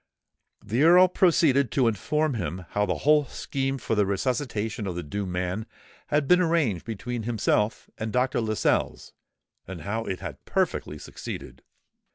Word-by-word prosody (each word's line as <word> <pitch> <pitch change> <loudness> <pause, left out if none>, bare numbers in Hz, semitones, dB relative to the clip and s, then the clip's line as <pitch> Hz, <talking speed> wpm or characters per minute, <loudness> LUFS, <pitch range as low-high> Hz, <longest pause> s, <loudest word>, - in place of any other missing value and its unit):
The 115 +6 0
Earl 180 +3 +7
proceeded 155 - +3
to 130 -4 +3
inform 150 +8 0
him 90 -4 -4
how 105 0 0
the 90 - 0
whole 150 -1 +5
scheme 135 +1 -3
for 115 - -3
the 105 -1 +3
resuscitation 110 0 -2
of 90 - -3
the 90 - -4
doomed 95 +5 -4
man 90 +5 -2 0.4
had 150 -1 +1
been 180 +3 +5
arranged 160 - +1
between 115 +2 -4
himself 110 -1 0
and 110 0 -3
Dr. 125 +2 +1
Lascelles, 110 -1 -1 0.5
and 90 -3 -7
how 110 +7 -3
it 95 - -3
had - - -8
perfectly - - -1
succeeded. - - -8
115 Hz, 155 wpm, -26 LUFS, 100-140 Hz, 0.5 s, Earl